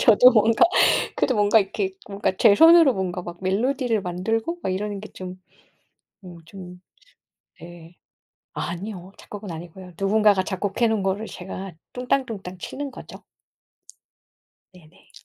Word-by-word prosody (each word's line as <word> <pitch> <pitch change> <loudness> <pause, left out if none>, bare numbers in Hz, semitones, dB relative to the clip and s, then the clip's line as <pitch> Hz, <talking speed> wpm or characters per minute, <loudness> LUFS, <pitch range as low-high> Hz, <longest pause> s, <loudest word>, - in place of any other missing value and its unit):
저도 245 +3 +7
뭔가 225 +7 +4 0.5
그래도 255 - +1
뭔가 205 +1 +4
이렇게 195 -1 -2 0.2
뭔가 200 -1 -1
제 200 - +6
손으로 325 -1 +7
뭔가 185 -1 -3
막 175 0 -9
멜로디를 230 +3 0
만들고 225 - -3
막 185 - -2
이러는 205 +1 -4
게 215 - -10
좀 185 0 -9 0.8
어 175 -1 -11
좀 180 0 -12 0.8
네. 170 0 -13 0.6
아니요. 185 +2 -6
작곡은 205 -2 -9
아니고요. 175 +2 -10
누군가가 200 -1 +3
작곡해 205 +5 -1
놓은 220 -3 0
거를 195 +3 -2
제가 190 +1 -8 0.2
뚱땅뚱땅 240 -7 -3
치는 280 - -6
거죠. - - -12 1.5
네 170 -4 -18
네. - - -25
195 Hz, 275 characters per minute, -23 LUFS, 180-225 Hz, 1.5 s, 저도